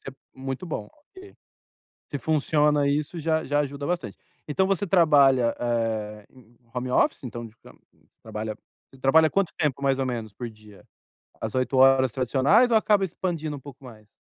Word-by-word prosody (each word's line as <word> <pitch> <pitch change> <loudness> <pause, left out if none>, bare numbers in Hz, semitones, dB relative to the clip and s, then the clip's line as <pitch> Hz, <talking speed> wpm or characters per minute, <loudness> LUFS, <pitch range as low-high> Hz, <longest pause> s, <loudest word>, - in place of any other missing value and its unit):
Isso - - -10
é - - -4 0.2
muito 135 +6 -6
bom, 155 - -5 0.3
OK. 390 +1 -13 0.8
Se 145 - -3
funciona 150 0 +2
isso, 150 +4 -1
já 160 0 0
já 145 +1 0
ajuda 140 0 -5
bastante. 175 -1 -3 0.3
Então, 190 +6 +1
você 195 0 0
trabalha, 140 -9 +4
eh, 110 -3 -2
em 130 - -19
em 115 0 -25
em 115 - -32
home 125 0 -3
office, 290 - +1
então 120 -1 -6
de 110 - -20
ca - - -16
você - - -31 0.2
trabalha 110 0 -5 0.4
você 135 - -18
trabalha 160 +4 +5
quanto 195 -4 +1
tempo, 145 -3 -1
mais 135 -1 +1
ou 135 - -1
menos, 115 -4 -4
por 120 +4 -7
dia? 110 -2 -16 0.6
As 110 +1 -4
8 130 +1 0
horas 130 -1 +5
tradicionais 140 - +3
ou 225 - +4
acaba 210 -2 +3
expandindo 165 -4 -4
um - - -10
pouco 140 0 -13
mais? 110 -4 -14
135 Hz, 190 wpm, -25 LUFS, 120-160 Hz, 0.8 s, trabalha